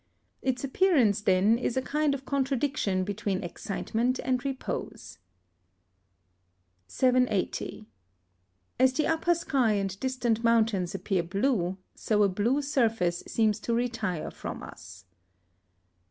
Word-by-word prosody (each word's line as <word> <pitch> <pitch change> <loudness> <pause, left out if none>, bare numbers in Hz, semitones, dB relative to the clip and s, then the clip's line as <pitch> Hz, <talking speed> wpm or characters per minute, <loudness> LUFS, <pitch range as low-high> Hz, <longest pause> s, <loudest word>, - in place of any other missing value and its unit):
Its 260 -1 -1
appearance, 270 - +3
then, 200 +3 +3
is 245 0 -2
a - - +2
kind 295 +1 +1
of 270 -1 -9
contradiction 270 -8 0
between 200 -1 -2
excitement 225 +7 -2
and 255 -1 0
repose. 270 - -5 1.7
780. 250 -4 0 0.9
As 260 0 +5
the 305 - 0
upper 325 +2 +2
sky 265 -9 +1
and 195 -1 -2
distant 245 -3 -1
mountains 220 -6 +2
appear 190 -1 0
blue, 190 0 0 0.2
so 210 -1 +1
a - - +5
blue 235 +10 0
surface 225 - +1
seems 215 -2 +1
to 230 +2 -1
retire 225 -8 -2
from - - -7
us. 90 +2 -12
230 Hz, 115 wpm, -28 LUFS, 195-260 Hz, 1.7 s, As